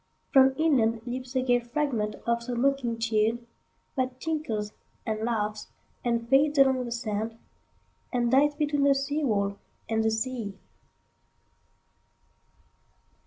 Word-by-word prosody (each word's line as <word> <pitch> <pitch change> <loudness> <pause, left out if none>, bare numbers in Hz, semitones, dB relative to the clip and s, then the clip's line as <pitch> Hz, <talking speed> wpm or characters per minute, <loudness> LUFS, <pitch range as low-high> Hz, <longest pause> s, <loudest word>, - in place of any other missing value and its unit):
From 265 -1 +6
inlandLeaps 250 -3 0
a 255 - +2
gay 245 -1 +4
fragment 240 -3 -2
of 235 0 +1
some 240 0 -3
mocking 270 -4 +1
tune, 225 +1 0 0.5
That 255 -1 -2
tinkles 255 -10 -2 0.3
and 215 -1 -2
laughs 215 -2 -2 0.4
and 235 -1 0
fades 285 +3 +3
along 265 -2 +4
the 240 - -6
sand, 225 -1 -3 0.7
And 240 -2 +1
dies 290 +3 +4
between 290 -1 0
the 280 -1 +5
seawall 270 -9 0 0.3
and 220 -1 +1
the 220 - +3
sea. 220 -2 -3
240 Hz, 120 wpm, -27 LUFS, 225-275 Hz, 0.7 s, From